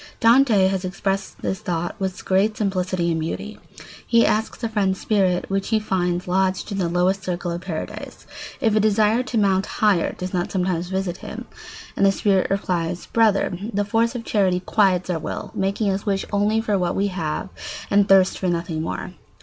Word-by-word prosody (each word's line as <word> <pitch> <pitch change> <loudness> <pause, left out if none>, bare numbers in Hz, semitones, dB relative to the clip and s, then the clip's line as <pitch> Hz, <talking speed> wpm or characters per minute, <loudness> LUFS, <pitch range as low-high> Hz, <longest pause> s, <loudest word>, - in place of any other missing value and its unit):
] - - -30
Dante 230 -4 +5
has 190 -1 -1
expressed 195 +1 -3
this 190 - -2
thought 175 -1 -3
with 190 -1 -4
great 200 +3 +2
simplicity 185 -4 0
and 160 - 0
beauty. 200 +6 -5 0.5
He 230 -1 +4
asks 220 +2 -1
a 230 - 0
friend's 195 -3 0
spirit, 190 -4 +1
which 195 0 -1
he 220 -1 +2
finds 180 -4 -1
lodged 190 +3 0
in 200 - -2
the 175 -3 0
lowest 185 +3 +1
circle 175 -1 -3
of 170 +1 -4
paradise, 175 -4 -6 0.3
if 220 -2 +2
a - - +4
desire 215 +2 +3
to 250 -2 -3
mount 195 -2 +2
higher 205 -6 +2
does 185 +1 -5
not 175 -1 -1
sometimes 180 -2 -1
visit 190 -2 -2
him; - - -8 0.5
and - - 0
the 195 - +6
spirit 195 -1 +1
replies: 180 -3 -1
"Brother, 215 -5 +3 0.2
the 205 -1 0
force 225 +3 +1
of 230 -2 -5
charity 185 -4 +1
quiets 185 -2 +2
our 165 - -1
will, - - -5
making 200 +2 0
us 195 +1 -2
wish 195 -2 -1
only 210 +2 +2
for 210 -3 0
what 175 -1 0
we 200 - +1
have 170 -1 -3 0.4
and 200 0 +4
thirst 190 -1 +5
for 185 - -1
nothing 170 -2 -1
more. 170 +2 -4
190 Hz, 190 wpm, -22 LUFS, 180-210 Hz, 0.5 s, the